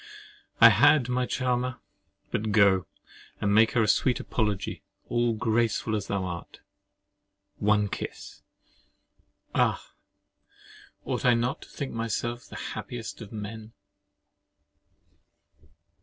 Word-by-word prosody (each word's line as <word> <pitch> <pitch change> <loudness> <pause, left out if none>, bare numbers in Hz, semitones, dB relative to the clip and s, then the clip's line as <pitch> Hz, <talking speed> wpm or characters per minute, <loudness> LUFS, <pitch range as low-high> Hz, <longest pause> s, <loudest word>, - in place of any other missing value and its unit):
I - - +10
had, 130 -5 +5
my 125 0 0
charmer. 125 -1 -1 0.5
But 110 0 -1
go, 100 -5 +4 0.5
and 100 -1 +1
make 110 +1 +5
her 115 - +3
a - - +1
sweet 125 +5 +2
apology, 105 -4 -2 0.3
all 120 -1 +1
graceful 110 0 0
as 100 -2 -3
thou 100 -2 -1
art. 85 -2 -7 1.0
One 105 0 +2
kiss! - - -7 1.1
Ah! - - 0 1.1
ought - - -2
I 125 -1 +5
not 120 +3 -1
to - - -13
think 140 - -5
myself 115 +1 -3
the - - -11 0.2
happiest 120 -1 -7
of 105 - -9
men? 110 +1 -7
110 Hz, 110 wpm, -27 LUFS, 105-120 Hz, 1.1 s, I